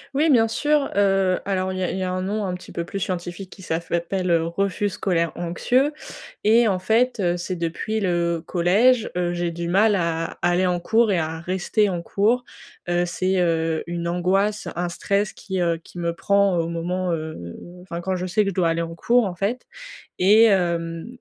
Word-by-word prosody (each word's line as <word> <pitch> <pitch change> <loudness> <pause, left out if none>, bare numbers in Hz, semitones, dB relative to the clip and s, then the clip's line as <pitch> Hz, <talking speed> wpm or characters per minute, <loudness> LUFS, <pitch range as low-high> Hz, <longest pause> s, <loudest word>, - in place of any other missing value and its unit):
Oui, 310 +3 +3
bien 230 -5 +5
sûr. 295 +5 +1
Heu, 195 -2 +2
alors 190 -1 -1
il 185 - -4
y 185 - -1
a - - 0
il - - -3
y 190 - -2
a 185 - -2
un 185 0 -2
nom 205 +2 -2
un 180 - -2
petit 180 - -9
peu 170 - -4
plus 195 +3 -5
scientifique 180 +1 -4
qui 190 - -13
s'appelle 170 +2 -2
heu, 165 -1 +3
refus 195 +3 -1
scolaire 170 -4 0
anxieux 245 - +1 0.5
et 225 +2 +5
en 190 -3 +1
fait, 225 +6 +1
heu, 175 -3 +1
c'est 180 +1 -4
depuis 170 +6 -2
le 170 -3 0
collège, 215 +7 +3
heu, 175 0 0
j'ai 175 0 -1
du 170 0 -5
mal 205 +3 +4
à 165 -2 -2
aller 175 +1 +2
en 180 -1 0
cours 220 +4 +2
et 185 - +2
à 160 0 -2
rester 190 +4 0
en 175 -2 -3
cours. 225 +8 +1 0.5
Heu, 175 0 +2
c'est, 185 +2 0
heu, 165 -2 0
une 170 0 -3
angoisse, 195 +4 0
un 175 0 -1
stress 200 +3 -1
qui, 190 -2 -5
heu, 170 -1 +1
qui - - -14
me 170 -1 -1
prend 200 +1 +2
au 165 - -1
moment, 175 +2 -2
heu, 155 - -5 0.3
enfin 170 -2 -6
quand 185 +1 -2
je 185 +1 -3
sais 210 +4 +2
que 195 - -1
je - - -9
dois 175 -2 +2
aller 165 0 0
en 165 0 -6
cours 235 +7 +2
en 185 - -3
fait 200 +8 -2 0.5
et 210 +5 +6
hem, 170 -5 +1
185 Hz, 210 wpm, -23 LUFS, 170-200 Hz, 0.5 s, et